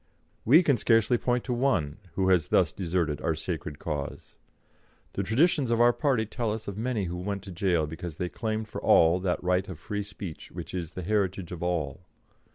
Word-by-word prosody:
We 155 +10 +7
can 140 -6 +3
scarcely 115 +1 +3
point 125 -1 0
to 125 - -2
one 105 - +1 0.2
who 95 -1 +1
has 90 -5 +3
thus - - +3
deserted 85 -5 -1
our 80 - 0
sacred 75 -3 -4
cause. 75 -3 -5 0.7
The - - -1
traditions 130 - +2
of 115 -1 +2
our 120 0 +6
party 125 -3 +1
tell 110 +1 -2
us 110 0 -5
of 100 - -4
many 115 -1 -1
who 90 -1 -4
went 100 +2 -3
to 100 - -8
jail 85 -3 +1
because 80 +1 -6
they 90 - -2
claimed 110 +2 -3
for - - -6
all 85 +2 +5
that 90 -1 -1
right 90 +2 +1
of 90 - -6
free 105 +6 -4
speech 100 -4 -8
which - - -7
is 85 -4 -4
the 90 - -5
heritage 95 -2 -1
of 90 - -6
all. 85 -3 -2
95 Hz, 200 wpm, -28 LUFS, 85-115 Hz, 0.7 s, We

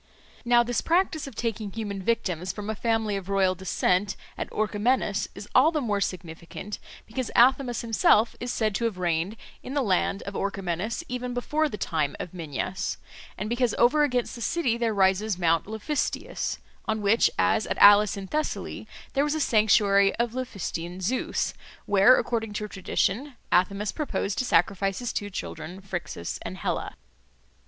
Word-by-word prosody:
Now 240 0 +5
this 240 -1 -1
practice 335 -3 +1
of 270 - -10
taking 225 -3 -3
human 205 -2 -4
victims 185 -4 -1
from 210 0 -5
a - - -4
family 225 -1 0
of 195 -1 -7
royal 195 -2 +3
descent 185 +1 0 0.2
at - - -4
Orchomenus 215 0 0
is 200 +1 -8
all 280 +6 +6
the 310 - 0
more 210 -7 -1
significant 175 +3 -5 0.3
because 240 +2 -4
Athamas 250 0 +4
himself 225 0 +3
is 245 0 -3
said 215 -2 0
to 235 - -1
have 220 -5 -1
reigned 175 +4 -1 0.2
in 265 - -7
the 285 - +2
land 195 -1 +1
of 200 - -6
Orchomenus 195 +1 -2
even 250 0 -4
before 300 +5 0
the 210 - -5
time 155 -6 -1
of 175 - -6
Minyas, 180 +3 -3 0.4
and 210 - -3
because 240 0 +1
over 255 +6 +4
against 250 -4 0
the 235 - -8
city 255 -2 +1
there 235 -1 0
rises 195 0 +2
Mount 165 -1 +2
Laphystius, 220 +7 -2 0.3
on 220 -1 -1
which, 210 +3 +4
as - - +2
at - - -2
Alus 205 0 +7
in 195 - -5
Thessaly, 305 +10 -3 0.3
there 275 - +2
was 295 +1 0
a - - -1
sanctuary 205 -5 +4
of 235 -1 -1
Laphystian 185 -8 -4
Zeus, 245 +8 -1 0.3
where, 205 +5 +6
according 225 -3 -1
to 210 0 -3
tradition, 210 +7 -1 0.2
Athamas 200 +3 +2
purposed 210 -9 -2
to 255 - 0
sacrifice 195 0 +2
his 245 -1 -3
two 205 - -3
children 175 -2 -6
Phrixus 175 - -5
and - - -6
Helle. - - -2
210 Hz, 165 wpm, -26 LUFS, 190-240 Hz, 0.4 s, Alus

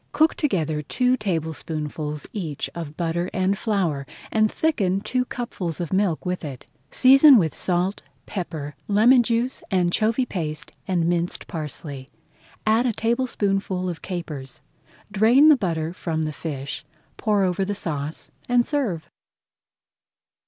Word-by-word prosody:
Cook 315 +1 +4
together 160 - 0
two 250 - +1
tablespoonfuls 155 - -3
each 165 -9 -4
of 155 -3 -7
butter 170 +1 -1
and 185 +1 +2
flour, 180 - -1 0.2
and 215 -1 +3
thicken 200 - +1
two 250 +5 -1
cupfuls 190 -10 -4
of 175 0 -3
milk 190 -4 +1
with 180 0 -2
it. 135 -5 -7 0.2
Season 270 +1 +8
with 165 -7 +2
salt, 180 +2 0 0.2
pepper, 160 -7 -5
lemon 230 +5 +6
juice, 235 +2 0
anchovy 215 +7 +2
paste, 165 -5 -4 0.2
and 175 -3 +1
minced 170 0 -1
parsley. 145 -3 -5 0.6
Add 225 +3 +3
a 235 - +1
tablespoonful 200 -6 0
of 175 -2 -4
capers, 155 -8 -6 0.5
drain 235 +9 +6
the 305 - +8
butter 165 - -2
from 160 -3 -2
the 155 0 -2
fish, 145 -2 -5 0.3
pour 210 -2 +2
over 185 +1 +1
the 205 +1 -2
sauce, 150 -5 -4 0.2
and 245 -1 +4
serve. 210 - -1
185 Hz, 130 wpm, -24 LUFS, 160-220 Hz, 0.6 s, Season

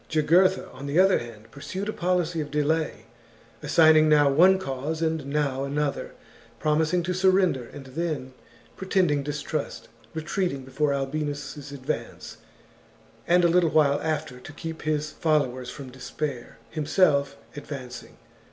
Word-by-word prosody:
Jugurtha, 170 +5 +3
on 135 +2 -8
the 140 +3 -1
other 190 +1 +5
hand, 115 -2 -11
pursued 185 - -6
a 215 - -2
policy 175 -2 0
of 145 - -5
delay, 150 +2 -1 0.6
assign 160 -1 +5
ing 155 0 +5
now 145 -2 +5
one 185 +7 +6
cause 150 -2 -4
and 160 -3 -1
now 140 -2 -1
another, 145 +1 -2 0.4
promising 160 +3 +1
to 180 +2 -1
surrender 185 -8 +2
and 140 - -10
then 140 -2 -4 0.4
pretending 185 -6 +1
distrust, 145 +1 -4 0.3
retreating 160 -3 -2
before 140 +3 0
Albinus' 145 0 -4
advance, 135 -2 -5 0.9
and 175 +1 +4
a - - +7
little 170 0 +3
while 145 -2 +3
after, 155 -5 -3
to 135 - -11
keep 160 +2 -7
his 150 -1 -1
followers 130 -6 0
from 130 0 -9
despair, 130 0 -5
himself 145 -3 +2 0.2
advancing. 130 -5 -8
150 Hz, 135 wpm, -26 LUFS, 140-165 Hz, 0.9 s, a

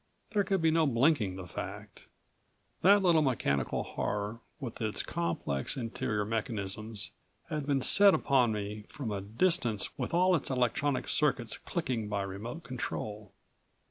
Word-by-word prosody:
There 205 -2 +2
could 190 -3 0
be 160 - +5
no 160 -1 +3
blinking 120 - +2
the 95 -1 -7
fact. 90 - -8 0.7
That 200 +2 +6
little 170 -3 +5
mechanical 90 - 0
horror, 105 +2 -3 0.2
with 125 -6 -6
its 110 -1 -1
complex 85 - -2
interior 115 -3 -2
mechanisms, 105 -1 -3 0.4
had 150 -2 -3
been 140 -3 +1
set 200 +5 +7
upon 125 -4 +3
me 105 0 -4
from 130 -7 -5
a 100 -1 -2
distance 115 - +1
with - - -2
all 185 +2 +4
of 165 - +3
its - - -3
electronic 130 +2 0
circuits 135 -6 +1
clicking 125 - -3
by 100 -1 -1
remote 105 - -6
control. 105 -5 -5
120 Hz, 145 wpm, -31 LUFS, 105-150 Hz, 0.7 s, set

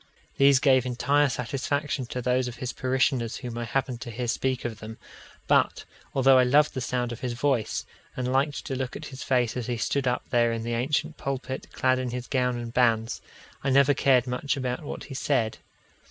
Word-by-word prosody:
These 140 0 +6
gave 130 -2 +4
entire 140 +4 +2
satisfaction 135 +2 -2
to 125 +1 -4
those 125 +1 +1
of 125 - -6
his 125 +1 -4
parishioners 130 -2 0
whom 120 -3 -6
I 120 0 -3
happened 125 0 -2
to 120 - -6
hear 120 +2 -4
speak 130 +2 -1
of 115 -3 -4
them; 110 +1 -8 0.5
but, - - +2 0.3
although 135 -1 +6
I - - +6
loved 145 +4 +4
the 130 - -3
sound 125 0 -1
of 120 - -6
his 125 -2 -3
voice, 125 -3 0 0.3
and 125 0 -1
liked 140 +2 0
to 135 - -3
look 130 -1 -3
at 155 - -7
his 130 - -8
face 125 -3 +1
as 125 -3 -3
he 120 -1 -1
stood 135 +3 0
up 125 - 0
there 120 -1 +3
in 115 -1 -3
the 120 0 -2
ancient 150 +6 -1
pulpit 135 -1 -4
clad 130 0 +1
in 130 -1 -2
his 125 0 -4
gown 125 -2 0
and 120 -1 -6
bands, 115 -3 +2 0.4
I 135 - +1
never 140 +1 +5
cared 130 -2 +3
much 125 +3 -2
about 125 -2 -2
what - - -6
he 135 - -9
said. 130 -4 0
125 Hz, 210 wpm, -26 LUFS, 120-135 Hz, 0.5 s, These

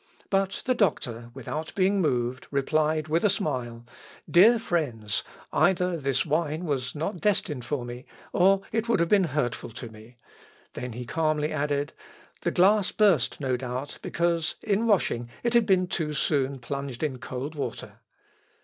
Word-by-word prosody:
But 195 -1 0
the 255 - +3
doctor, 120 - 0
without 150 +5 -5
being 195 +1 +3
moved, 125 -5 -1
replied, 155 +2 +1
with 160 +2 +1
a 210 - +5
smile, 125 - -2 0.4
"Dear 215 +7 +7
friends, 135 - -1 0.3
either 180 -2 +3
this 135 -4 0
wine 155 +2 -1
was 130 -4 -2
not 165 +4 -3
destined 180 - 0
for 130 -2 -2
me, 120 +1 -8 0.3
or 195 +1 +4
it 225 +1 -1
would 235 - +3
have 170 0 +2
been 200 -3 +5
hurtful 140 -7 -2
to 120 +1 -8
me." 110 +2 -15 0.6
Then 125 -1 -5
he 125 +2 -6
calmly 155 +2 0
added, 145 -1 -1 0.5
"The - - +1
glass 195 +2 +4
burst, 205 -7 +3
no 130 -3 0
doubt, 130 +3 -5
because 170 -1 0
in 215 +2 +1
washing 120 - +1
it 235 0 +1
had 235 -2 +4
been 185 -2 +4
too 155 -4 -2
soon 140 -2 +1
plunged 140 +1 -5
in 135 -5 -2
cold 130 +5 -5
water." 145 -3 -5
150 Hz, 160 wpm, -27 LUFS, 130-185 Hz, 0.6 s, Dear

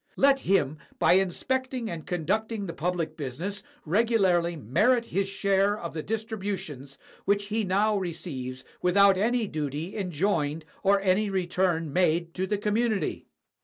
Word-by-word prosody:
Let 275 0 +4
him, 165 - +1 0.2
by - - +4
inspecting 250 +7 0
and 165 -6 -6
conducting 205 +5 -1
the 170 - -5
public 170 -2 -2
business, 165 +9 -4 0.2
regu 225 +8 +2
larly 175 -4 +2
merit 230 - +2
his 195 -3 -1
share 195 +1 +2
of 170 -5 -6
the 155 - -3
distributions 195 - -4 0.3
which 200 0 +1
he 220 +1 0
now 205 +3 +2
receives 150 -9 -4 0.2
without 195 +2 +5
any 230 +4 +1
duty 155 0 -4
enjoined 165 -5 -1 0.2
or 200 0 +4
any 200 +2 +2
return 175 -4 0
made 170 -1 +1
to 190 +1 -2
the 210 - 0
community. 210 +1 -1
190 Hz, 140 wpm, -27 LUFS, 165-210 Hz, 0.3 s, without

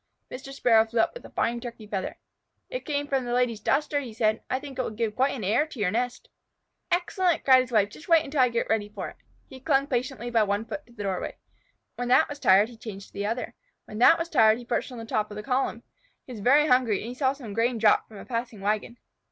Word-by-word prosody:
Mr. 265 +2 -8
Sparrow 230 -5 +4
flew 225 +1 -3
up - - +2
with - - -10
a - - -10
fine 235 0 -1
Turkey 235 -3 -8
feather. 200 -2 -4 0.5
"It - - -5
came 290 -1 -1
from 270 -2 0
the 240 0 -3
Lady's 245 -3 +1
duster," 290 +6 +1
he 250 -5 -7
said. 215 0 +1
"I 260 - 0
think 270 -2 -9
it - - +3
will - - -3
give 220 -1 -3
quite 270 +2 +1
an 235 - -6
air 230 +11 +2
to 280 - -11
your 190 -3 +1
nest." 245 +3 -2 0.6
"Excellent!" 355 0 +1
cried 260 -1 +7
his 255 -1 -6
wife. 210 -3 +3
"Just 305 - -13
wait 330 -1 +5
until 285 0 -3
I 250 - +5
get 235 0 -1
ready 210 -2 0
for 210 - -6
it." - - -16 0.3
He 265 - -12
clung 275 0 +2
patiently 250 -2 -3
by 230 -2 +3
one 205 +1 0
foot 295 +6 -7
to 240 - -19
the 210 -3 -7
doorway. 190 -2 -3 0.6
When 245 - -3
that 255 +6 +5
was 290 0 -8
tired 200 +1 +5
he 235 - -13
changed 210 -4 -9
to - - -32
the 200 +1 -3
other. 230 +3 -3 0.3
When 215 - -8
that 325 +7 +7
was 335 - -3
tired 225 -9 +4
he 245 - -10
perched 240 +2 -2
on 250 - -8
the 225 - -7
top 215 -1 -1
of 210 - -9
the 210 - -6
column. 255 -2 -1 0.4
He - - -11
was 215 - -8
very 280 +7 +5
hungry, 250 -7 +3
and 215 - -6
he - - -5
saw 260 +1 +1
some 245 -7 -9
grain 230 +2 +1
dropped 215 -1 +3
from 215 - -13
a - - -10
passing 230 -3 -4
wagon. 215 +4 -2
240 Hz, 260 wpm, -26 LUFS, 220-270 Hz, 0.6 s, cried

